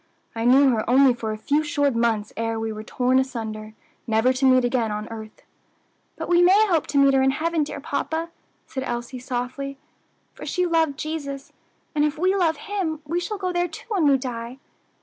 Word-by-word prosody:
"I 230 0 -3
knew 270 +3 +6
her 225 -2 0
only 265 +1 +6
for 225 -2 -4
a 215 - -4
few 290 +7 +1
short 285 -2 +1
months 230 -2 0
ere 225 0 -2
we 225 0 -3
were 215 - -7
torn 250 +3 +1
asunder, 220 -4 -4 0.3
never 225 +3 +3
to 265 +1 0
meet 255 -1 +5
again 240 -3 0
on 210 +1 -4
earth." 220 -1 -9 0.7
"But - - -5
we 350 0 +4
may 385 +5 +6
hope 330 -5 +1
to 285 - -1
meet 275 0 +5
her 265 - +4
in 265 - +4
heaven, 320 +3 0
dear 290 - -6
papa," 320 +4 -3 0.3
said 265 - -5
Elsie 240 0 -4
softly, 255 +3 -4 0.6
"for - - -11
she 360 - 0
loved 325 -5 +1
Jesus, 285 -3 -5 0.4
and 295 -1 +2
if 300 +1 0
we 370 +4 +2
love 335 -5 +2
Him 390 -8 -3
we 335 +4 -1
shall 420 +4 -4
go 370 -2 -2
there 350 0 +1
too 325 - -10
when 375 -9 +2
we 275 -1 +5
die. 245 -1 -6
270 Hz, 205 wpm, -23 LUFS, 235-320 Hz, 0.7 s, knew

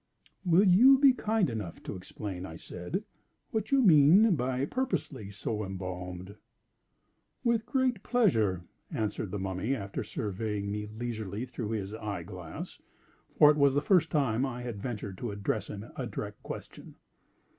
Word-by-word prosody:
"Will 185 +2 +5
you 245 +10 +8
be 270 -1 +6
kind 220 -4 +1
enough 105 -9 -5
to - - -5
explain," 95 0 -6
I 80 -3 -7
said, 90 - -5 0.5
"what 220 -4 -2
you 275 -2 +4
mean 180 +4 +7
by 130 0 -1
'purposely 150 - -3
so 105 +2 -3
embalmed'?" 90 0 -6 1.1
"With 235 -2 +1
great 255 -4 +1
pleasure!" 110 - +2 0.3
answered 105 -1 -2
the 105 - -3
Mummy, 95 +6 -1
after 100 -4 -4
surveying 105 0 -3
me 105 0 -3
leisurely 110 -1 -4
through 115 -4 -5
his 100 -2 -3
eye 105 -5 -4
glass—for 90 - -1
it 150 - -1
was 140 -2 +4
the 145 - +3
first 175 -5 +4
time 130 -5 +1
I 125 -2 -3
had 115 -5 -5
ventured 105 -6 -5
to 120 - -3
address 100 0 -2
him 105 +1 -7
a - - -3
direct - - -6
question. - - -9
115 Hz, 150 wpm, -30 LUFS, -, 1.1 s, you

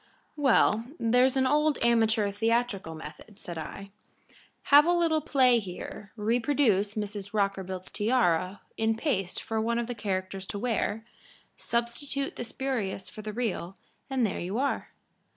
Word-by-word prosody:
_" - - -34 0.3
"Well, 245 -6 +3
there's 250 +3 +3
the 265 -1 +3
old 300 +2 +3
amateur 225 -3 +3
theatrical 225 -5 0
method," 160 +6 -11
said 170 -2 -6
I. 195 +5 -8 0.8
"Have 295 +3 +9
a 350 - +4
little 330 -3 +2
play 260 -5 +4
here, 195 +1 -8
reproduce 225 -2 +1
Mrs. 205 -1 -5
Rockerbilt's 190 -2 -2
tiara 200 -5 +1 0.2
in 225 0 +1
paste 195 - -1
for 220 -1 -1
one 235 +1 0
of 235 - 0
the 245 - -4
characters 190 -3 -3
to - - -3
wear, 225 -1 -1 0.5
substitute 240 +4 -2
the - - -4
spurious 225 -7 -3
for 215 - -9
the 215 0 -5
real, 205 -5 -3 0.3
and 260 -3 +1
there 200 - -2
you 185 +5 -3
are." 280 +2 -1
225 Hz, 150 wpm, -28 LUFS, 195-250 Hz, 0.8 s, Have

